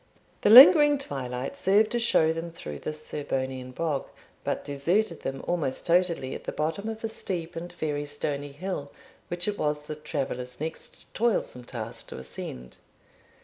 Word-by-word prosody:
The - - +3
lingering 295 - +10
twilight 130 - -4
served 205 +3 +3
to 240 - +1
show 160 -9 +3
them 165 +1 -4
through 75 - -7
this 155 0 -6
Serbonian 130 -3 -3
bog, 145 +1 -2 0.4
but - - -2
deserted 165 +7 0
them 135 0 -4
almost 160 -7 -1
totally 170 -6 +2
at - - -8
the - - -2
bottom 165 +8 -2
of 220 0 -6
a - - +1
steep 175 -6 -5
and 170 +1 -6
very 150 -3 -2
stony 145 0 -3
hill, 145 -2 -5 0.4
which 175 +2 -3
it 205 -1 -2
was 150 0 0
the 150 - -5
travellers' 135 -4 -4
next 160 +2 -7
toilsome 215 - 0
task - - -6
to - - -8
ascend. 60 -1 -8
155 Hz, 160 wpm, -27 LUFS, 140-185 Hz, 0.4 s, lingering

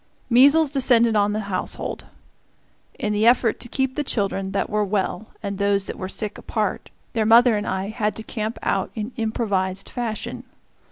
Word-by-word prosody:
Measles 285 +5 +6
descended 240 -5 +3
on 205 0 +3
the 215 +1 -1
household. 200 -3 -2 0.9
In 210 - -1
the 210 +2 +2
effort 240 -1 +3
to - - -5
keep 265 0 -1
the 295 - -1
children 195 -6 -1
that 195 - -1
were 210 0 0
well 205 +2 -2 0.2
and 200 -1 -4
those 200 -1 +1
that - - -5
were 185 - -4
sick 210 0 -4
apart, - - -3 0.2
their 225 -3 +1
mother 230 +2 +6
and 205 0 -2
I 190 +1 -2
had 215 -2 -1
to 220 - -5
camp 220 0 -4
out 195 - 0
in 220 +2 -4
improvised 200 -4 -1
fashion. 235 -4 -4
215 Hz, 175 wpm, -23 LUFS, 200-235 Hz, 0.9 s, Measles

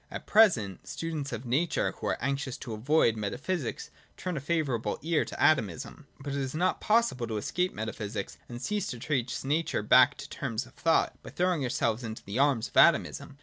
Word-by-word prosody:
At - - -7
present, 130 - +3
students 155 -4 -4
of 120 +1 -5
nature 145 +8 +1
who - - -6
are - - 0
anxious 140 0 -2
to 115 - -7
avoid 120 +1 +2
metaphysics 120 - -3 0.3
turn 180 -2 -3
a - - -2
favourable 140 -6 -1
ear 165 -1 +2
to - - -8
Atomism. 140 - +1
But 140 0 -5
it 140 - -1
is 135 +1 -3
not 180 +3 +1
possible 215 - +2
to 110 -1 -3
escape 180 - -1
metaphysics 110 -1 -5
and 120 0 -6
cease 205 +6 -2
to 125 - -5
trace 125 -1 -2
nature 150 -4 0
back 125 +5 +6
to 140 +1 -8
terms 125 -5 -3
of 130 - -18
thought, 165 -1 +1
by - - -10
throwing 180 -4 0
ourselves 120 -1 0
into 110 -1 -6
the 100 +6 -4
arms 140 -5 +2
of - - -25
Atomism. - - +4
135 Hz, 190 wpm, -29 LUFS, 115-160 Hz, 0.3 s, back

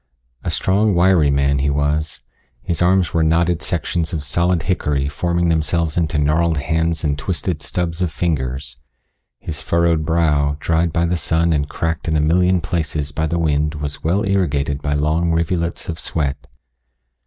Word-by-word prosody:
A - - -2
strong, 100 +1 +1
wiry 85 -4 +4
man 70 0 +2
he 70 +1 +1
was 75 +2 -1 0.4
his 85 +5 -2
arms 90 0 +3
were 85 - +2
knotted 85 +1 +2
sections 85 -1 -2
of 75 -3 -3
solid 85 +3 +1
hickory 75 -6 0
forming 85 +3 0
themselves 80 0 0
into 80 -2 0
gnarled 80 +2 +2
hands 80 +3 -1
and 75 -2 0
twisted 85 -1 -2
stubs 85 +2 -3
of 90 -3 0
fingers. 65 -6 -2 0.6
His 80 -2 -6
furrowed 85 -2 +1
brow, 75 -3 +1
dried 85 +1 +1
by 85 +2 +1
the 85 +1 0
sun 85 0 +1
and 75 -1 -1
cracked 80 +1 -3
in 80 -1 +1
a - - +2
million 90 +4 +3
places 75 -3 -2
by 80 +2 -1
the 85 +3 -1
wind 75 -1 0
was 75 -1 -5
well 95 +5 +1
irrigated 70 -7 0
by 70 0 -1
long 80 +3 +1
rivulets 85 +1 -1
of 80 -1 -4
sweat. 70 -4 -2
80 Hz, 165 wpm, -19 LUFS, 75-85 Hz, 0.6 s, wiry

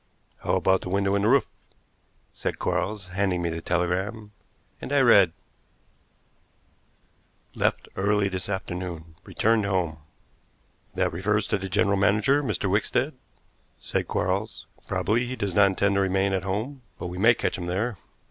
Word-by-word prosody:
"How - - 0
about 95 0 +2
the - - -6
window 100 +1 +1
in 100 - +2
the 105 - +2
roof?" 135 +3 +4 0.9
said - - -3
Quarles, 100 -3 -2
handing 90 -2 0
me 85 - 0
the 80 0 -4
telegram, 95 +6 -1 0.5
and - - -6
I 145 - +4
read: 100 -9 +6 2.2
"Left - - 0
early 100 +1 +2
this 95 0 -4
afternoon; 90 -4 -5
returned 110 -1 +1
home." 90 -5 -1 1.0
"That - - 0
refers 105 +4 0
to 105 - +1
the 95 0 -5
general 100 +1 +2
manager, 110 +8 +3
Mr. 110 - -2
Wickstead," - - +1 0.7
said - - -2
Quarles. - - -2 0.2
"Probably 120 +4 0
he 130 - -4
does 100 -6 -2
not 100 +1 +6
intend 100 +1 +1
to 100 - +2
remain 95 +1 +1
at 95 -1 -1
home, 110 +8 -3 0.2
but - - -6
we 90 +1 -5
may 115 +4 +6
catch - - -1
him 90 - -5
there. 100 +3 -2
100 Hz, 155 wpm, -26 LUFS, 90-105 Hz, 2.2 s, read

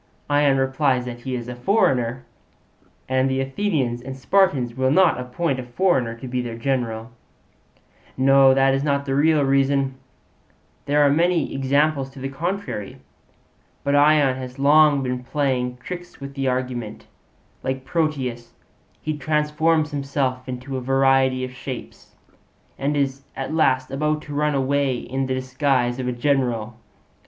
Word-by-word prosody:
Ion 145 -2 +4
replies 135 -1 +1
that 120 -1 -6
he 130 +1 -4
is 120 -1 -5
a 125 - -5
foreigner, 125 - +1 0.8
and 130 0 +1
the 130 0 0
Athenians 135 -4 -1
and 130 +1 -7
Spartans 140 -7 +2
will 130 +1 +1
not 180 0 +4
appoint 130 +3 -2
a - - -4
foreigner 125 -2 0
to 130 +3 -9
be 125 0 -2
their 115 -2 -6
general. 115 -3 -2 1.1
'No, 135 0 +6
that 135 0 +4
is 135 +1 0
not 140 -1 0
the 135 - -2
real 150 +1 +3
reason; 135 0 +2 0.9
there 145 +1 +3
are - - +5
many 170 +3 +1
examples 140 +1 +1
to 135 - -13
the 135 +1 -4
contrary. 165 - -4 0.9
But 140 - 0
Ion 145 -2 +4
has 130 0 -8
long 145 0 +5
been 125 -1 -3
playing 125 -2 -1
tricks 175 +7 -8
with 140 0 -8
the 135 -1 -2
argument; 125 -4 -3 0.6
like 130 0 -3
Proteus, 135 -7 -2 0.5
he 155 0 -2
transforms 150 +1 +1
himself 135 -3 -2
into 130 +2 -5
a - - -4
variety 135 0 +2
of 130 - -8
shapes, 125 - -9 0.6
and 145 +2 -1
is 135 -1 -1
at 135 +3 -4
last 130 -5 +2
about 150 +2 -1
to 145 - -8
run 150 0 +1
away 135 0 +1
in 135 +2 -3
the 130 - -1
disguise 130 -1 0
of 125 - -3
a - - 0
general. 120 -3 -1
135 Hz, 150 wpm, -22 LUFS, 125-145 Hz, 1.1 s, No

